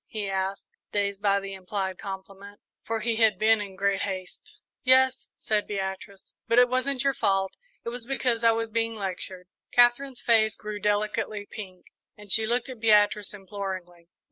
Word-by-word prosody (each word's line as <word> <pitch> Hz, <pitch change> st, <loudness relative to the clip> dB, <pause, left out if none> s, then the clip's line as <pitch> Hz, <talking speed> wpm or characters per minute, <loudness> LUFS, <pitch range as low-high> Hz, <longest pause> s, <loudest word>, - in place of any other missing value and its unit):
he 210 Hz, -2 st, -4 dB
asked, 195 Hz, 0 st, -3 dB, 0.2 s
dazed 200 Hz, -1 st, -1 dB
by 200 Hz, -1 st, +3 dB
the 195 Hz, 0 st, -7 dB
implied 190 Hz, 0 st, -3 dB
compliment, 195 Hz, +1 st, -8 dB, 0.2 s
for 225 Hz, -1 st, -3 dB
he 230 Hz, 0 st, 0 dB
had 220 Hz, -4 st, +4 dB
been 220 Hz, +1 st, +4 dB
in 195 Hz, -2 st, -7 dB
great 200 Hz, 0 st, +1 dB
haste. 185 Hz, -2 st, -6 dB, 0.2 s
"Yes," 260 Hz, 0 st, +4 dB
said 215 Hz, -2 st, 0 dB
Beatrice; 195 Hz, 0 st, -5 dB
"but 230 Hz, +1 st, +2 dB
it 245 Hz, 0 st, +8 dB
wasn't 255 Hz, +1 st, 0 dB
your 275 Hz, 0 st, +2 dB
fault. 195 Hz, -6 st, 0 dB, 0.3 s
It -, -, -1 dB
was 240 Hz, 0 st, -7 dB
because 250 Hz, -4 st, 0 dB
I 230 Hz, -, +7 dB
was 225 Hz, 0 st, 0 dB
being 230 Hz, 0 st, -1 dB
lectured." 185 Hz, -2 st, -5 dB, 0.2 s
Katherine's 245 Hz, +2 st, +3 dB
face 220 Hz, -2 st, +4 dB
grew 210 Hz, -1 st, -6 dB
delicately 210 Hz, 0 st, -1 dB
pink, 185 Hz, -4 st, -9 dB, 0.3 s
and 205 Hz, -1 st, -11 dB
she 220 Hz, 0 st, +3 dB
looked 240 Hz, +1 st, 0 dB
at 255 Hz, -3 st, -8 dB
Beatrice 210 Hz, -2 st, +3 dB
imploringly. 190 Hz, -4 st, -7 dB
210 Hz, 170 wpm, -27 LUFS, 195-230 Hz, 0.3 s, it